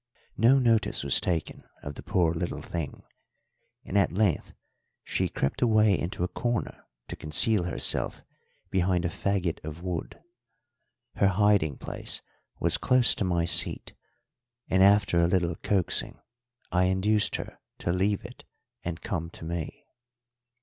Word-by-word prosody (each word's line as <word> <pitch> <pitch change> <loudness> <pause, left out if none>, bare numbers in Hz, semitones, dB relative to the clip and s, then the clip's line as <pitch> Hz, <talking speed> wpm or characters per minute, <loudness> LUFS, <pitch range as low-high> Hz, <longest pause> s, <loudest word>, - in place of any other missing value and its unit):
No 120 +5 +5
notice 115 - +2
was 70 - +2
taken 85 -4 -2 0.2
of 70 - -5
the - - -9
poor 85 -3 +1
little 85 +1 -4
thing, 80 -5 -5 0.8
and - - -6
at 95 - +2
length 95 -3 0 0.5
she - - -1
crept 70 - -2
away 110 -4 +4
into 85 0 -3
a - - +1
corner 120 +4 -3 0.2
to - - -6
conceal 90 +5 +2
herself 90 - 0 0.5
behind 90 -1 +1
a - - +1
faggot 95 -1 -2
of 80 +3 -7
wood. 90 -3 -4 1.0
Her 100 - +4
hiding 100 -7 +2
place - - -6 0.4
was - - +1
close 125 -2 +5
to - - -2
my 85 -2 +1
seat, 85 - 0 0.7
and 95 - +2
after 100 -2 +5
a 85 - +4
little 90 -1 +1
coaxing 95 -4 -1 0.5
I 90 0 +3
induced 100 +3 +1
her - - -7 0.2
to 85 - -2
leave 95 +3 0
it - - -11 0.4
and 85 -1 -5
come 85 -6 -3
to 85 - -10
me. 85 -1 -5
90 Hz, 145 wpm, -27 LUFS, 85-105 Hz, 1.0 s, No